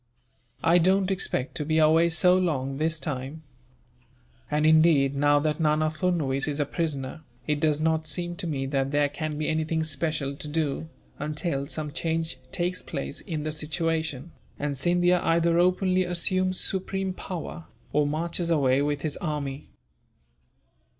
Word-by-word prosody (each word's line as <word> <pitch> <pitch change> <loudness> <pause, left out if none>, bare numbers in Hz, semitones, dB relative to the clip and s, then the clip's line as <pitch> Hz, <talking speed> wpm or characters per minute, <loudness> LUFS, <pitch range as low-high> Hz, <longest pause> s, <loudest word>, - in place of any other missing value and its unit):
"I 170 +2 +5
don't 190 +2 +3
expect 135 -8 -1
to 150 - -2
be 155 +2 0
away 160 +2 +5
so 180 +2 +4
long, 135 -7 0
this 160 +2 0
time. 145 +1 -5 1.1
And 150 +1 +1
indeed, 155 -3 +5
now 145 +1 +4
that 150 +1 -1
Nana 155 0 +2
Furnuwees 155 -5 0
is 150 0 -2
a 145 - +2
prisoner, 150 -2 -3 0.2
it 150 -1 0
does 150 -1 +2
not 160 0 +1
seem 175 +4 -3
to 175 - -3
me 135 -4 -2
that 135 0 0
there 145 0 +2
can 155 0 -4
be 155 - -1
anything 160 0 0
special 155 -2 -2
to 150 - -5
do, 155 0 -2 0.3
until 150 -1 -2
some 150 -1 -4
change 165 -3 -2
takes 180 +1 -1
place 140 -4 -5
in 160 -6 -4
the 155 - -2
situation, 160 -1 -2 0.3
and 145 0 -2
Scindia 175 +5 +2
either 170 0 +3
openly 185 +1 +3
assumes 185 +1 +1
supreme 190 0 -1
power, 175 -2 -6 0.3
or 150 -1 +3
marches 170 +3 -2
away 140 -4 +3
with 145 0 -1
his 155 -2 -2
army." 145 -4 -4
155 Hz, 155 wpm, -26 LUFS, 145-170 Hz, 1.1 s, I